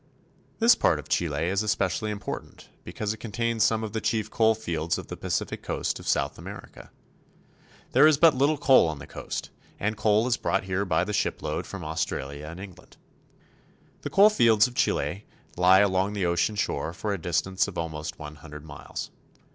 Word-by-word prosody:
This 230 +1 +6
part 80 - +2
of 75 0 -9
Chile 80 -2 0
is 95 +2 +1
especially 105 0 0
important 105 -1 -7
because 105 0 -3
it - - -10
contains 115 0 -1
some 110 -1 +2
of 110 - -5
the 110 - -2
chief 110 -1 -1
coal 110 -1 +3
fields 85 -6 -2
of - - -8
the - - -5
Pacific - - -3
coast - - -2
of - - -10
South - - 0
America. - - -10 1.0
There 135 +5 +6
is 155 -2 +4
but 165 0 +6
little 140 +4 +2
coal 130 -10 +5
on 80 -2 -3
the 70 - -9
coast, - - -6 0.3
and 105 +2 -1
coal 110 +1 +2
is 125 -1 +1
brought 95 - 0
here 95 +1 -1
by 85 -2 +1
the 105 +3 -4
shipload - - -2
from - - -7
Australia 75 -2 -4
and 85 +3 -8
England. 95 -2 -12 1.0
The - - -4
coal 205 +2 +6
fields 115 - +5
of 125 - -4
Chile 100 -4 -1 0.3
lie 90 +2 +6
along 95 0 +1
the 100 -3 -1
ocean 85 +5 +1
shore 85 -5 -2
for 105 +2 -3
a 95 - -5
distance 95 +5 0
of 100 - -8
almost 80 -2 -4
one 75 0 -9
hundred 75 0 -11
miles. 75 -2 -7
100 Hz, 185 wpm, -26 LUFS, 85-110 Hz, 1.0 s, This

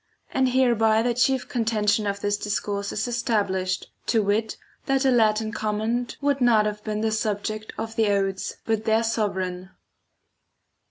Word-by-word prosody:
And 260 -1 +2
hereby 230 -4 +3
the 240 0 +1
chief 250 +2 +1
contention 215 -3 +1
of 200 0 -2
this 205 0 +1
discourse 205 -1 -3
is - - -2
established, 200 -6 -1 0.2
to 225 -3 +2
wit 215 +2 0 0.3
that 270 0 +2
a 265 - +5
Latin 220 -2 +2
comment 220 +3 -2
would 280 -1 +1
not 225 -3 +4
have 210 0 -3
been 215 0 -2
the 220 0 +1
subject 215 0 -2
of 225 0 -5
the 220 -1 +2
odes 195 -1 -1
but 220 -1 -1
their 220 +1 +3
sovran. 190 -5 -2
220 Hz, 155 wpm, -24 LUFS, 205-235 Hz, 0.3 s, a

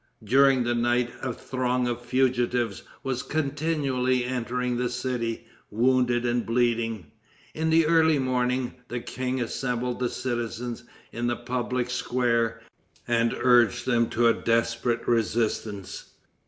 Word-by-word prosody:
During 135 +3 +4
the 120 0 0
night 120 0 +1
a 130 - -2
throng 125 0 -1
of 120 0 -2
fugitives 120 -3 0 0.2
was 130 -2 -2
continually 140 -4 0
entering 125 0 -2
the 125 0 0
city, 125 -2 -3 0.2
wounded 120 +1 +2
and 120 0 +1
bleeding. 115 -7 0 0.4
In 160 +1 -1
the 160 0 +4
early 160 -1 +4
morning, 125 -1 0
the 120 +1 -3
king 130 +2 -3
assembled 125 0 -2
the 125 -1 0
citizens 120 -1 -4 0.3
in 120 +1 -2
the 120 - 0
public 125 0 -2
square, 115 -2 0 0.4
and 115 -1 +2
urged 120 -5 +4
them 120 -2 +2
to 120 +1 +2
a 115 - +5
desperate 115 +1 0
resistance. 110 -3 -1
120 Hz, 125 wpm, -26 LUFS, 115-130 Hz, 0.4 s, a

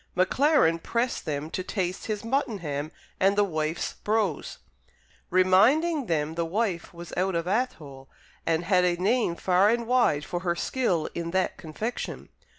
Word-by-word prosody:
Maclaren 185 - +3
pressed 235 +7 -2
them 150 +1 -3
to - - -2
taste 185 -2 -3
his 215 -1 -3
muttonham 200 - -2 0.3
and 195 +1 +3
"the 205 - +5
wife's 155 -3 -2
brose," 210 -7 -1 0.7
reminding 240 - +4
them 155 -2 0
the 170 +1 -1
wife 185 0 -2
was 170 0 -10
out 185 0 0
of 170 0 -1
Athole 155 - -3 0.3
and 165 0 0
had 180 -1 +3
a 175 -1 +2
name 200 0 +1
far 185 +3 +3
and 235 +1 +1
wide 230 -12 +2
for 175 - -3
her 175 -1 -1
skill 180 -6 0
in 170 -1 -4
that 185 +1 0
confection. 215 +9 -5
185 Hz, 155 wpm, -27 LUFS, 165-225 Hz, 0.7 s, the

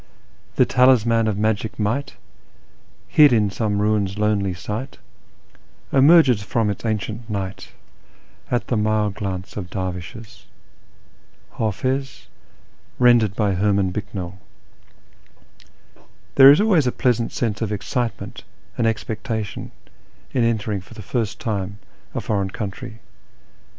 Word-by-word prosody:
" - - -33
" - - -34
The - - +5
talisman 115 -3 +4
of 105 -2 -1
magic 110 +1 -1
might, 130 +7 -2 0.9
hid 150 -2 +6
in 105 -4 +2
some 105 -1 -1
ruin's 105 -2 0
lonely 105 -3 0
site, 105 +9 -6 1.0
Emerges 135 -5 +6
from 105 +1 0
its 100 - -7
ancient 110 +1 -3
night 95 -2 -5 0.8
at 120 - 0
the 120 - -1
mild 105 -1 +1
glance 95 -1 -5
of 90 -4 -5
dervishes." 95 +6 -6 1.1
(Hdfiz, 130 +6 -2 0.7
rendered 120 -5 +4
by 105 -3 +1
Herman 100 0 +1
Bicknell.) 95 -2 -6 1.9
There 135 0 +9
is 145 - +7
always 190 -10 +3
a - - +2
pleasant 120 -2 0
sense 110 -4 -2
of 110 -2 -1
excitement 115 +3 -3 0.4
and 115 - +3
expecta 110 0 -2
tion 100 - -8 0.6
in 125 - +2
entering 110 -3 0
for 105 +5 -15
the 110 - -9
first 115 +1 -2
time 100 -4 -3 0.4
a - - -1
foreign 100 -2 -1
country. 110 +4 -7
110 Hz, 125 wpm, -22 LUFS, 100-120 Hz, 1.9 s, There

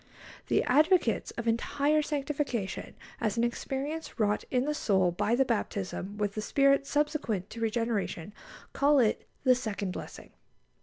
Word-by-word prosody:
The - - +2
advocates 305 - +3
of 235 0 -3
entire 285 +6 +2
sanctification 280 -8 -3 0.2
as 220 -1 -1
an 230 - +2
experience 270 +6 -3
wrought 210 -1 +1
in 255 0 +1
the 300 - 0
soul 190 -10 +2
by 210 +6 +1
the 270 +2 +3
baptism 205 -4 -3
with 205 -1 -1
the 215 - -3
Spirit 275 +3 +3
subsequent 290 - -1
to 230 - -7
regeneration 220 -5 -1 0.4
call 285 +1 +4
it 230 -5 +2 0.2
"the 255 -1 +6
second 210 -6 -3
blessing." - - -8
235 Hz, 145 wpm, -29 LUFS, 210-280 Hz, 0.4 s, the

